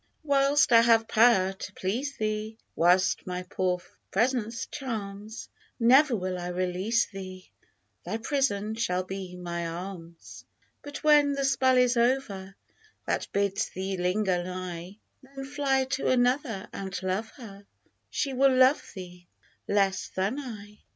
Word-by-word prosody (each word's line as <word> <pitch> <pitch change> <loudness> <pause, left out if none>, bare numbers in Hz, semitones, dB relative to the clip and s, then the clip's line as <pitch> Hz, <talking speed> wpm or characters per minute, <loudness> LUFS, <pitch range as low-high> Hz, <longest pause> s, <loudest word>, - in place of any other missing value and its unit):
Whilst 280 0 +3
I 230 -1 +8
have 230 -1 +4
powV 195 -5 +4
to 190 - -7
please 250 +11 -3
thee, 215 0 -3 0.2
Whilst 180 +4 +3
my 180 0 -3
poor 180 0 -1 0.3
presence 230 +1 0
charms, 215 -5 -6 0.3
Never 260 +3 +5
will 185 -2 -3
I 175 - -5
release 185 +5 0
thee, 185 -2 -10 0.5
Thy 220 - -3
prison 225 -4 -1
shall 185 -5 -1
be 185 -1 -7
my 170 -1 -4
arms! 170 -1 -8 0.4
But 290 0 -8
when 295 -2 +5
the 275 0 -1
spell 260 -1 +3
is 250 -1 +3
over 235 -6 0 0.5
That - - -1
bids 200 +1 0
thee 190 +1 -4
linger 180 0 0
nigh, 180 +1 -6 0.2
Then 270 0 -9
fly 270 -1 0
to 265 - -1
another 245 -4 +1
and 195 -1 -5
love 190 +4 -2
her 200 -6 -12 0.2
— - - -44
She 275 -2 -2
will 265 0 +4
love 260 +3 +5
thee 180 -2 -10 0.4
less 195 -1 +1
than 195 +9 -2
I. 210 -6 -9
210 Hz, 140 wpm, -27 LUFS, 185-255 Hz, 0.5 s, I